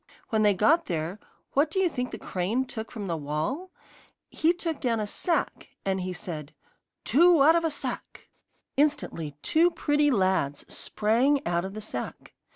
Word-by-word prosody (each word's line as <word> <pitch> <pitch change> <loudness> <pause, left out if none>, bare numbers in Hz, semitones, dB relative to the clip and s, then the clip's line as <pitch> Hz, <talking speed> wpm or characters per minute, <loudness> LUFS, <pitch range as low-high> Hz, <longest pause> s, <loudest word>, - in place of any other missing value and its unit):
When 220 -1 +2
they 205 -2 +4
got 290 - +3
there, 170 +3 -3 0.3
what 290 +3 +3
do 320 - -5
you 380 -1 +4
think 250 -6 -3
the - - -6
crane 205 +8 -1
took 225 -3 -6
from 215 -3 -5
the 170 -3 -1
wall? 155 - -3 0.6
He 325 +1 +3
took 340 -3 -3
down 230 -3 +1
a 210 - -1
sack, 335 - -1 0.2
and 190 -1 0
he 185 0 -3
said: 155 -5 -6 0.5
'Two 335 0 +6
out 320 +3 +7
of 335 - +2
a 325 - +2
sack!' 295 - -6 0.5
Instantly 265 - 0
two 335 +3 +4
pretty 295 -3 +2
lads 185 - +1
sprang 255 +7 +1
out 175 +1 0
of 195 +1 -7
the 215 - -5
sack. 125 - -6
225 Hz, 170 wpm, -27 LUFS, 185-300 Hz, 0.6 s, out